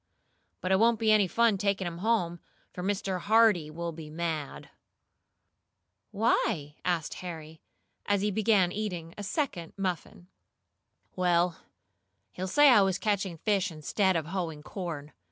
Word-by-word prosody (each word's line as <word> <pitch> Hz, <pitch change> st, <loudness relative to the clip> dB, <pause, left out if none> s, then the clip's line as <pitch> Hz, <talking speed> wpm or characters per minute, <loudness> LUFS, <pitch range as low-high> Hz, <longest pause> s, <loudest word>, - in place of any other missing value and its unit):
But 185 Hz, -, -2 dB
it 190 Hz, -, +4 dB
won't 230 Hz, +1 st, +4 dB
be 220 Hz, -1 st, +3 dB
any 210 Hz, -3 st, +5 dB
fun 225 Hz, 0 st, +2 dB
taking 200 Hz, -1 st, 0 dB
'em 170 Hz, -1 st, -5 dB
home, 180 Hz, -5 st, 0 dB, 0.3 s
for 180 Hz, -, -6 dB
Mr. 190 Hz, -1 st, -1 dB
Hardee 210 Hz, -5 st, +4 dB
will 170 Hz, +2 st, -4 dB
be 155 Hz, -1 st, -9 dB
mad." 155 Hz, -2 st, -4 dB, 1.4 s
"Why?" 195 Hz, -9 st, 0 dB
asked 175 Hz, -3 st, -1 dB
Harry, 160 Hz, -3 st, -8 dB, 0.5 s
as 205 Hz, -1 st, +2 dB
he 210 Hz, -, +1 dB
began 200 Hz, -3 st, +3 dB
eating 180 Hz, -5 st, -4 dB
a -, -, -7 dB
second 200 Hz, -, -3 dB
muffin. 180 Hz, -2 st, -4 dB, 0.9 s
"Well, 175 Hz, -1 st, +2 dB, 0.7 s
he'll 185 Hz, +1 st, -5 dB
say 290 Hz, +9 st, +6 dB
I 240 Hz, -5 st, +7 dB
was 190 Hz, -1 st, +2 dB
catching 195 Hz, -5 st, -1 dB
fish 200 Hz, +2 st, 0 dB
instead 185 Hz, +5 st, 0 dB
of 160 Hz, -2 st, -1 dB
hoeing 165 Hz, -3 st, -4 dB
corn. 155 Hz, -5 st, -6 dB
185 Hz, 140 wpm, -29 LUFS, 170-205 Hz, 1.4 s, I